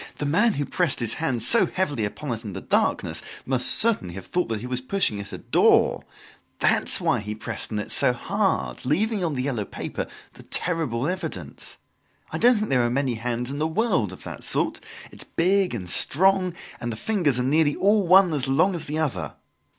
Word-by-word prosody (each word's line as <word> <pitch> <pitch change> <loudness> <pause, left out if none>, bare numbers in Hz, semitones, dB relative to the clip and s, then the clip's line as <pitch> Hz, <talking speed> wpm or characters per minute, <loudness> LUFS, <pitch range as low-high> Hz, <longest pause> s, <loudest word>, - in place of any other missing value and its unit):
"The 145 - -3
man 205 +10 +2
who 145 - -2
pressed 175 -3 -1
his 115 -2 -1
hand 130 -8 0
so 230 - +7
heavily 145 - -2
upon 130 +6 -6
it 115 +1 -7
in 105 -3 -7
the - - -6
darkness - - 0 0.2
must 130 -1 +1
certainly 210 - +3
have 95 - -8
thought 180 0 -1
that 110 -2 -4
he - - -7
was 125 0 -2
pushing 130 - -1
at 100 -1 -8
a - - -6
door! - - +2 0.5
That's - - +3
why - - +1
he 105 +1 -6
pressed 110 - -5
on 105 - -2
it 105 - -4
so - - +5
hard, 60 -2 -2
leaving 200 - 0
on 160 -4 -1
the 125 - -2
yellow 125 -6 -2
paper - - -6 0.3
the - - -14
terrible 155 -8 -2
evidence. 160 - -5 0.5
I 160 - -3
don't 245 +2 +5
think 215 0 -2
there 125 -2 +3
are 120 - +1
many 130 0 -1
hands 120 +2 -3
in 140 - -5
the 155 - 0
world 180 - 0
of 90 - -10
that - - -7
sort. - - +1 0.3
It - - -15
is - - -8
big 185 -2 +2
and 95 -6 -6
strong 185 - +3 0.2
and 120 0 -4
the 110 - -6
fingers 170 - 0
are 125 - 0
nearly 145 +2 +2
all 205 +2 +3
one 185 -1 +6
as 140 -2 0
long 160 +9 +2
as 170 - -5
the 150 +2 -4
other! 155 -4 -3
145 Hz, 210 wpm, -24 LUFS, 120-180 Hz, 0.5 s, so